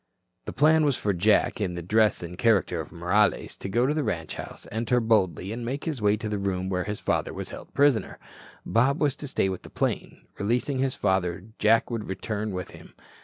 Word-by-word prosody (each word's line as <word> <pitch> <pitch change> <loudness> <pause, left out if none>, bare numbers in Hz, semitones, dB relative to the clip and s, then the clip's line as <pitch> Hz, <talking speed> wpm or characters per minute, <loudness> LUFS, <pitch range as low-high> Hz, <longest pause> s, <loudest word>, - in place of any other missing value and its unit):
The - - -4
plan 155 +4 +4
was 145 -3 +2
for 100 - 0
Jack, 105 +4 +2
in 90 -4 -1
the 85 - -5
dress 105 +1 +2
and 85 +1 -6
character 95 -5 +2
of 75 - -10
Morales, 95 +5 +1
to 95 - -6
go 120 +5 +2
to 145 - +2
the 155 -1 0
ranch 85 -8 -3
house, - - -8
enter 115 +3 +1
boldly 105 -4 +1
and 120 +2 -4
make 135 +5 -3
his 150 -8 -3
way 105 0 +3
to 110 - -5
the 105 -1 -2
room 95 -1 -2
where 90 -1 -1
his 105 +1 -4
father - - -1
was - - -5
held - - -10
prisoner. 140 -5 +2 0.5
Bob 135 +7 +2
was 145 -3 +2
to 145 - -6
stay 115 - +1
with 95 -1 -3
the - - -12
plane. - - -3
Releasing 125 +6 0
his 135 0 0
father, 95 -2 0 0.2
Jack 115 +3 +3
would 115 -3 -3
return 105 +2 -3
with 90 -1 -5
him. - - -14
105 Hz, 220 wpm, -26 LUFS, 95-125 Hz, 0.5 s, plan